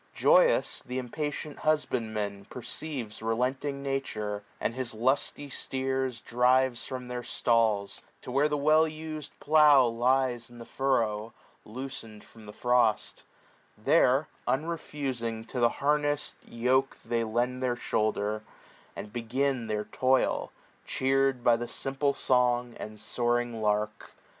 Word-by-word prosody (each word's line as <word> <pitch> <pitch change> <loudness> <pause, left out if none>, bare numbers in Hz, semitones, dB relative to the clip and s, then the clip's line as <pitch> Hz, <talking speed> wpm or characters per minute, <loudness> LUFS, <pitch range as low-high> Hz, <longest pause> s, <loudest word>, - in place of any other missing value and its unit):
Joyous, - - +4
th' 125 - -9
impatient 145 +4 -4
husbandman 110 -9 -1
perceives 125 -3 -6
Relenting 130 +5 -1
Nature, 110 -7 -3 0.2
and - - -1
his 125 -2 -3
lusty 130 +4 0
steers 130 -2 -2
35 - - -33
Drives 125 +1 +3
from 125 -1 -6
their 125 0 -4
stalls, 115 -5 +1 0.2
to - - -7
where 140 +4 +3
the 150 - 0
well 155 +2 +4
us'd 155 -1 -6
plough 150 -3 +6
Lies 120 0 +1
in 120 - -14
the 115 - -9
furrow, 115 -5 0 0.3
loosened 115 -2 -7
from 110 -2 -16
the - - -7
frost; 120 -1 +1 0.5
There, - - +3 0.2
unreftising, 130 -7 -2
to 125 - -3
the 120 -1 +5
hamess'd 145 +2 0
yoke 130 +3 +1
They 115 -1 0
lend 120 +3 -1
their 125 -1 +1
shoulder, 110 -2 -1 0.5
and 105 - -8
begin 125 +1 -1
their 105 -1 -2
toil, 130 0 +1 0.3
Cheer'd 135 -1 +1
by 120 -1 +5
the 120 +1 -4
simple 135 +2 -1
song 125 -1 +2
and 110 0 -7
soaring 120 -1 -1
lark. 105 0 -1
125 Hz, 130 wpm, -29 LUFS, 115-135 Hz, 0.5 s, plough